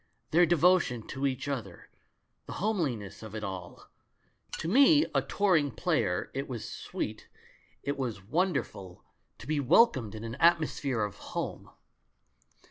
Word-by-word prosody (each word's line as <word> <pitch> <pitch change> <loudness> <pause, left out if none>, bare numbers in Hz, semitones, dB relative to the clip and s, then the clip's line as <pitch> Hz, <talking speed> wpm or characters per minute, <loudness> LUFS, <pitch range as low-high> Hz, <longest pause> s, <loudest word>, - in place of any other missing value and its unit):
Their 175 +2 +5
devotion 170 -8 +3
to 135 +1 -1
each 130 +1 -3
other, 115 -11 -5 0.6
the - - -6
homeliness 155 - -2
of 110 -1 -9
it 110 - -5
all! 95 -3 -7 0.7
To - - -4
me, 280 - +6
a - - +3
touring 180 -8 +2
player, 90 -6 -1
it 135 +1 -4
was 120 -4 -5
sweet, - - -5 0.6
it 140 +1 -3
was 125 -5 -2
28 - - -13
THE - - -15
MAN 95 +3 -22
WHO 165 - +2
UNDERSTOOD 180 -5 0
WOMEN 95 -1 -9
wonderful, 90 - -18 0.3
to - - -12
be 155 -1 0
welcomed 130 - +4
in 110 - -7
an 115 0 -5
atmosphere 155 -7 +2
of 105 -1 -4
home. - - -5
135 Hz, 165 wpm, -29 LUFS, 110-170 Hz, 0.7 s, me